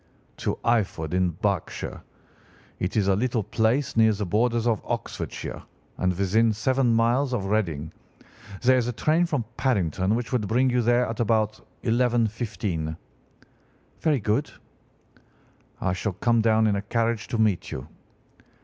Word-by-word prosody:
"'To - - -2
Eyford, 95 -9 0
in 90 -1 +2
Berkshire. 95 +2 -3 0.8
It 90 +4 -2
is 100 -2 +2
a 95 - +4
little 115 +1 0
place 115 +7 0
near 110 -1 +5
the 105 0 -3
borders 115 +5 +1
of 115 -4 +1
Oxfordshire, - - -5 0.4
and 90 - +2
within 110 +4 +3
seven 130 +3 +1
miles 125 +4 +2
of 100 -5 -2
Reading. 80 -8 -1 0.7
There 130 +1 +5
is 120 - -1
a 125 - -2
train 160 +8 +2
from 145 -9 -1
Paddington 100 - +1
which 120 +2 -3
would 120 -5 0
bring 125 +4 +2
you 125 0 +2
there 120 +1 +3
at 115 0 -5
about 110 -2 +1 0.2
11:15.' 110 -9 0 1.0
"'Very 150 -4 +2
good.' 110 +7 0 1.3
"'I 95 - 0
shall 95 +2 -2
come 115 +4 +2
down 110 0 +3
in 105 -2 +2
a - - -2
carriage 115 +2 -1
to 115 - -2
meet 110 -5 +1
you. 65 - -6
110 Hz, 150 wpm, -25 LUFS, 100-120 Hz, 1.3 s, near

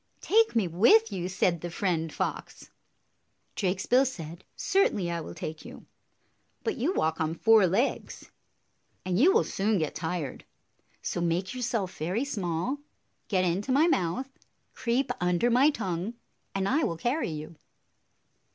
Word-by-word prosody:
"Take 445 - +3
me 215 -5 +2
with 220 +6 +5
you!" 180 -1 -3
said 180 -3 +1
the 175 - -4
Friend 170 -3 -1
Fox. - - -5 0.8
Drakesbill 200 +8 +2
said, 170 -7 -7
"Certainly 210 - +1
I 170 -1 -2
will - - -8
take 155 0 -6
you; - - -11 0.8
but 445 - -1
you 270 +8 0
walk 160 - 0
on 160 +1 -1
four 220 0 +5
legs, 205 +10 -1 0.7
and 185 0 0
you 335 +10 +6
will 455 +3 +4
soon 210 +2 0
get 155 -4 -1
tired. 160 -4 -4 0.6
So 175 - -2
make 175 +5 -1
yourself 235 -7 -2
very 185 - -1
small, 200 - -2 0.5
get 185 -3 +1
into 190 +9 -1
my 285 +5 +5
mouth, 255 - 0 0.4
creep 245 +3 0
under 180 +7 +2
my 260 +5 +5
tongue, 195 - -3 0.4
and 195 0 0
I 300 +7 +2
will 165 - -1
carry 245 - -1
you." 155 +1 -7
190 Hz, 145 wpm, -28 LUFS, 170-245 Hz, 0.8 s, you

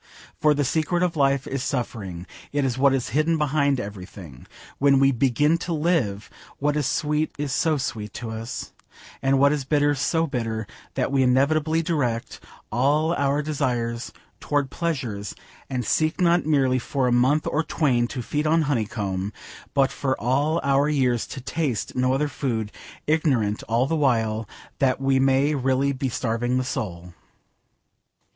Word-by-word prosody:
For 150 -1 +4
the 145 0 +1
secret 160 +5 0
of 175 -2 0
life 140 -2 +2
is 135 -1 -3
suffering. 105 -10 -4 0.3
It 145 -1 0
is 125 -2 0
what 135 +1 +4
is 130 -2 -1
hidden 155 +5 +2
behind 140 -2 +1
everything. 95 - -9 0.3
When 140 0 +5
we 135 0 +5
begin 140 +6 +2
to 175 0 -3
live, 150 - 0 0.3
what 145 +1 0
is 150 -4 0
sweet 150 +1 0
is 145 -1 -3
so 155 0 +2
sweet 110 -6 -4
to 115 -2 -5
us, 115 +2 -6 0.5
and 135 0 +3
what 140 +1 +5
is 150 -2 -1
bitter 145 +1 +2
so 160 +4 +1
bitter, 115 -6 -3 0.3
that - - 0
we 135 -1 +3
inevitably 155 +5 +2
direct 125 -8 -1 0.3
all 145 +8 +2
our 140 -1 +1
desires 120 -5 -2 0.3
towards 145 -2 0
pleasures, 130 -12 -3 0.3
and 125 -2 -2
seek 155 +2 +1
not 175 -3 +3
merely 135 -4 +3
for 130 +1 -1
a - - +2
'month 130 +5 +3
or 150 - +1
twain 125 -7 +1
to 125 0 -5
feed 150 +5 -1
on 160 +1 +3
honeycomb,' 105 -7 -2 0.4
but 135 -1 +3
for 130 -1 -2
all 145 +7 +1
our 140 +1 +3
years 125 -5 +1
to 135 - -7
taste 135 -3 -2
no 125 0 +2
other 145 +3 +1
food, 115 -7 -3 0.3
ignorant 135 -10 +1
all 115 +3 +2
the 160 - -1
while 115 -7 +1 0.3
that 135 -2 +2
we 135 0 +2
may 135 +2 +3
really 135 0 +1
be 130 0 -2
starving 120 +1 -1
the 130 - +1
soul. 90 -8 -5
135 Hz, 165 wpm, -24 LUFS, 120-150 Hz, 0.5 s, When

